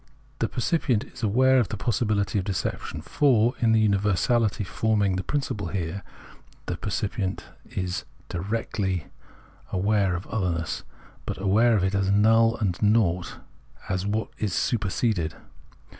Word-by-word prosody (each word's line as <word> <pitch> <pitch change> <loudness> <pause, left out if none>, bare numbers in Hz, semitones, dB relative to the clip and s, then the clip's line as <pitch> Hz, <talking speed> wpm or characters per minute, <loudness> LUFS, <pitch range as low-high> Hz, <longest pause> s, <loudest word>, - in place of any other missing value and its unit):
The 115 - +1
percipient 125 -4 +1
is - - -13
aware 130 +5 +4
of 115 - +1
the 110 - -5
possibihty 105 -1 0
of - - -2
deception; 95 -1 -3
for, 120 -5 +3
in 115 -2 +3
the 110 -1 +4
universaHty 105 +1 +1
forming 105 -1 +1
the 95 - -2
principle 135 -8 -2
here, 95 0 -3 0.6
the 90 - -2
percipient 100 0 -2 0.3
is 90 -1 -3 0.2
directly 95 -2 -2 0.7
aware 100 -1 +2
of 90 - -5
otherness, 85 -6 -2 0.5
but - - -3
aware 110 +5 +4
of 100 - +1
it 95 +1 +1
as 95 0 +1
null 115 +3 +4
and 95 -6 -1
naught, 105 -5 +2 0.5
as 95 0 -1
what 110 +2 -1
is 105 -5 -1
superseded. 100 -6 0
105 Hz, 135 wpm, -26 LUFS, 95-115 Hz, 0.7 s, aware